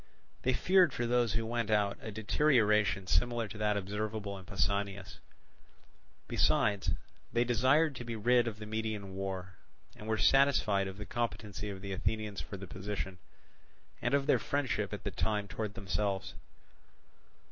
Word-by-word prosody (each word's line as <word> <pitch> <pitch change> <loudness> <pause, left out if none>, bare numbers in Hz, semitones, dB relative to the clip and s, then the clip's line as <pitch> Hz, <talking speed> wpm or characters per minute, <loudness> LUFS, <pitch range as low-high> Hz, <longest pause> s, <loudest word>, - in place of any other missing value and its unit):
They 130 - +2
feared 180 0 +4
for 120 - -1
those 120 -2 +2
who 115 0 0
went 115 -1 -1
out 105 -2 +2
a - - -6
deterioration 105 - +2
similar 120 +3 +1
to 105 - -9
that 105 -1 +1
observable 105 +1 -3
in 95 - -13
Pausanias; 100 0 -2 1.1
besides, 100 -1 +2 0.4
they 120 0 +3
desired 130 +6 +3
to - - -5
be 115 -1 -4
rid 120 +2 +3
of 110 -2 -3
the 105 - -7
Median 110 -2 -3
War, 95 -1 -4 0.4
and 105 - -10
were 110 0 +1
satisfied 110 -4 +4
of 95 0 -7
the 105 - -6
competency 105 -3 -3
of 95 -1 -7
the 100 0 -4
Athenians 105 +1 -2
for 100 - -7
the 95 - -7
position, 95 0 -5 0.8
and 120 +3 +2
of 140 -1 +1
their - - +4
friendship 140 -3 -1
at - - -6
the - - -2
time 105 -2 -1
towards 105 +3 -4
themselves. 100 0 -2
105 Hz, 160 wpm, -32 LUFS, 100-120 Hz, 1.1 s, feared